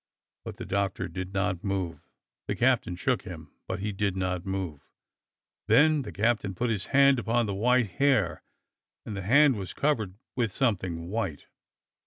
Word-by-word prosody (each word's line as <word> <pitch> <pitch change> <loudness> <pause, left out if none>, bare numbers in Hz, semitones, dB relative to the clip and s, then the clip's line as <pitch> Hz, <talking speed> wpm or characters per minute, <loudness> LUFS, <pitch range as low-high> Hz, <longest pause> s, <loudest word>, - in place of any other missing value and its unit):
But - - -7
the - - -6
Doctor 100 -1 -1
did 95 0 -6
not 95 -2 -1
move. 95 -6 -3 0.4
The - - -1
captain 120 -7 +2
shook - - 0
him, - - -10 0.2
but - - -3
he 105 +1 -2
did 100 -1 -1
not 90 0 -2
move. 95 -7 -4 0.8
Then 150 +7 +5
the - - -7
captain 105 -3 0
put 120 +5 0
his 100 -3 -2
hand 140 -2 +5
upon 120 0 +1
the 100 - -2
white 120 +1 +2
hair 105 -6 +2 0.6
and 110 - -5
the 100 - -4
hand 135 +5 +5
was 95 -2 -6
covered 110 -11 0 0.2
with 115 -5 0
some 115 +1 +2
thing 85 -2 -6
white. 95 -9 -3
100 Hz, 170 wpm, -28 LUFS, 95-120 Hz, 0.8 s, Then